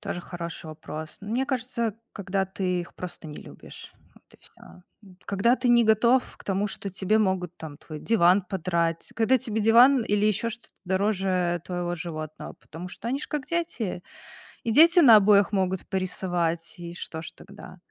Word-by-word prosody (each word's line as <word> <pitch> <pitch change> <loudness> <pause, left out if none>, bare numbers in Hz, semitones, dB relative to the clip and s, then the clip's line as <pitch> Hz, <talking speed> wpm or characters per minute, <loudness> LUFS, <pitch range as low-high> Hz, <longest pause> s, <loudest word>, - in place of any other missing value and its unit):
Тоже 175 - -4
хороший 170 -2 -7
вопрос. 155 0 -8
Мне 230 +6 -1
кажется, 235 -4 -2 0.2
когда 195 -1 -2
ты 185 -1 -2
их 175 - -10
просто 180 -2 -7
не 150 - -8
любишь, - - -12 0.2
вот - - -22
и - - -19
всё, - - -18 0.5
м. 190 -3 -17
Когда 200 +6 +2
ты 255 0 -1
не 240 -1 +5
готов 235 +4 +3
к - - -16
тому, 200 +1 -1
что 200 - -6
тебе 195 +3 +1
могут 190 -4 -1
там 155 -3 -9
твой 155 -1 -9
диван 190 -2 +4
подрать, 170 -3 -2
когда 230 +3 +3
тебе 220 -1 -3
диван 240 +4 +6
или 205 0 +1
ещё 215 +2 0
что-то 235 +1 -12
дороже 185 -2 0
твоего 175 -1 -3
животного, 155 -2 -7
потому 170 +3 -9
что 230 - -7
они 265 +3 -1
ж - - -6
как 295 -3 -4
дети. 320 - -3 0.6
И 230 - -1
дети 335 +8 +7
на 235 -8 +9
обоях 205 0 +4
могут 190 -2 -1
порисовать, 175 -3 -2
и 170 -1 -8
что 160 -2 -6
ж - - -8
тогда? 200 -1 -13
195 Hz, 180 wpm, -26 LUFS, 175-225 Hz, 0.6 s, на